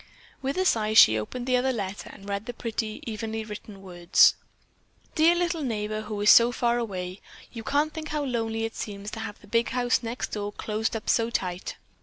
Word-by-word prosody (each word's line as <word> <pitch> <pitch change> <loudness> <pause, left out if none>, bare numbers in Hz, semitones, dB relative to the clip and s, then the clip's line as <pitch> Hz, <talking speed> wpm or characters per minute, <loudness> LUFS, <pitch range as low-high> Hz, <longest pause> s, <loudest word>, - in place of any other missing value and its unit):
With 275 +4 -2
a 375 - +1
sigh 215 -8 +2
she 110 - +8
opened 240 - -5
the 255 0 +2
other 260 +1 +1
letter 200 -4 -5
and 195 - -13
read 200 +1 -3
the 245 - -5
pretty, 220 -2 -4
evenly 220 0 -4
written 210 -2 -9
words: 175 -2 +4 0.8
"Dear 325 +2 +5
little 345 -2 0
neighbor 215 -4 -2
who 215 -1 -5
is 205 - +7
so 235 +1 +7
far 240 0 +1
away. 185 -4 -5 0.3
You 230 -2 -7
can't 295 +6 +1
think 315 -1 -6
how 300 -1 -2
lonely 225 -3 -1
it 225 - -6
seems 205 0 -6
to 225 - -6
have 215 -2 -6
the - - -16
big 230 +2 +1
house 245 0 +1
next 235 +1 -4
door 205 -1 -3
closed 220 +2 -2
up 220 - -5
so 230 0 +2
tight. 180 -5 -3
225 Hz, 205 wpm, -26 LUFS, 210-245 Hz, 0.8 s, she